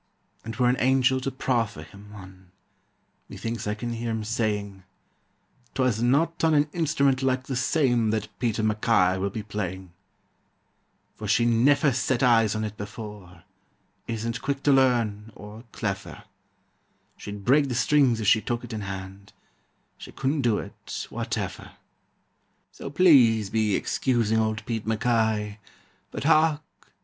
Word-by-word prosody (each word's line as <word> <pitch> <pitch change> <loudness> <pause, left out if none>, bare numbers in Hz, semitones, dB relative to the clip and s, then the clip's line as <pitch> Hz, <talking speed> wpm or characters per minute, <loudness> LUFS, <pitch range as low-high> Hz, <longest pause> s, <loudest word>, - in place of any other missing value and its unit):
And 115 0 -6
were 125 -1 +2
an 125 +1 +2
angel 130 0 +3
to 135 - -2
proffer 120 -10 -2
him 100 +6 -15
one, 95 -2 -13 0.8
Methinks 115 -1 -5
I 105 - -1
can 120 +2 -4
hear 115 0 -4
him 110 -1 -2
saying: 105 -3 -2 0.9
"'Twas 125 -4 +1
not 145 +8 +1
on 160 -1 +4
an 145 0 +3
instrument 140 -5 +1
like 130 -1 0
the 130 0 -4
same 125 -4 +1
That 110 -1 -1
Pete 115 -3 0
MacKay 105 -4 +2
will 100 +1 -1
be 105 +2 -6
playing, 95 -3 -5 1.2
"For - - -7
she 120 - +3
neffer 135 +5 +3
set 130 0 0
eyes 115 -4 +4
on 110 - -2
it 105 -1 -5
before, 100 -4 -9 0.6
Isn't 115 0 -3
quick 140 -1 -3
to 145 - +4
learn, 115 -5 +1
or 105 +3 -11
cleffer; 100 -3 -5 0.9
She'd 100 -1 -9
break 140 +2 +4
the 125 - -2
strings 130 -3 +3
if 110 - -3
she 110 +2 +4
took 120 +2 -3
it 120 -1 -8
in 110 - -4
hand, 95 0 -8 0.7
She - - -10
couldn't 140 +2 -1
do 115 -5 +2
it, - - -7
whateffer. - - -4 1.0
"So - - -8
please 130 - +5
be 110 -3 +1
excusing 115 -3 0
old 110 0 -1
Pete 115 -2 -4
MacKay 110 -2 0 0.5
But - - -6
hark! 155 0 +3
115 Hz, 145 wpm, -25 LUFS, 105-130 Hz, 1.2 s, please